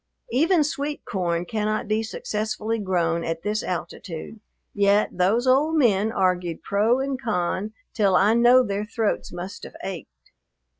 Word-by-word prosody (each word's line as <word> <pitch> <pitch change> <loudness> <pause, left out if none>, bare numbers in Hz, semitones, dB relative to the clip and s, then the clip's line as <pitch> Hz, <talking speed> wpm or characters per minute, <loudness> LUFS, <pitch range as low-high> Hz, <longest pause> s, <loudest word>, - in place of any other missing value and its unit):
Even 315 +6 +3
sweet 290 0 -3
corn 175 -3 -1
cannot 215 +3 -2
be 215 +1 +1
successfully 220 0 -3
grown 170 -4 0
at 165 0 -3
this 210 +1 -1
altitude, 175 +3 -6 0.3
yet 200 +1 +3
those 195 +7 +2
old 280 +5 +3
men 220 -6 +3
argued 180 -4 0
pro 220 +5 +2
and 270 -1 -2
con 210 -2 -1 0.2
till 200 -4 +2
I 200 +4 +4
know 240 +2 +6
their 205 -2 -2
throats 215 0 -2
must 180 +3 -7
have - - -10
ached. 160 - -8
210 Hz, 145 wpm, -24 LUFS, 185-235 Hz, 0.3 s, know